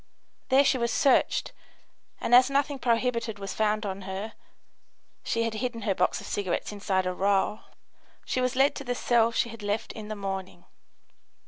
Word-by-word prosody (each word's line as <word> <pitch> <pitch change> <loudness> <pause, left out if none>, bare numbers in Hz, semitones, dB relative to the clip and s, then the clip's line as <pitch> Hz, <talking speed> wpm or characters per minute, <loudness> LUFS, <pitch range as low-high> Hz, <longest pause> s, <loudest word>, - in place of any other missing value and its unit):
There 270 +2 +5
she 260 - +2
was 235 0 0
searched, 275 - +2 0.7
and - - -1
as 255 +2 +8
nothing 280 0 0
prohibited 235 -2 0
was 195 -1 -5
found 215 0 0
on 195 0 -4
her 195 +4 -5 0.9
(she 230 - 0
had 230 -1 -2
hidden 230 0 -3
her 200 -2 +1
box 180 -1 +1
of - - -10
cigarettes 200 -1 -2
inside 195 -2 -1
a 185 - -1
roll) 200 +2 +1 0.7
she 255 - -1
was 255 0 0
led 270 +2 +4
to 275 - -6
the 245 -1 -2
cell 235 -2 +3
she 235 - 0
had 230 -1 -10
left 205 +1 -2
in 215 -2 -8
the 215 - -4
morning. 195 -3 -5
225 Hz, 180 wpm, -27 LUFS, 200-245 Hz, 0.9 s, as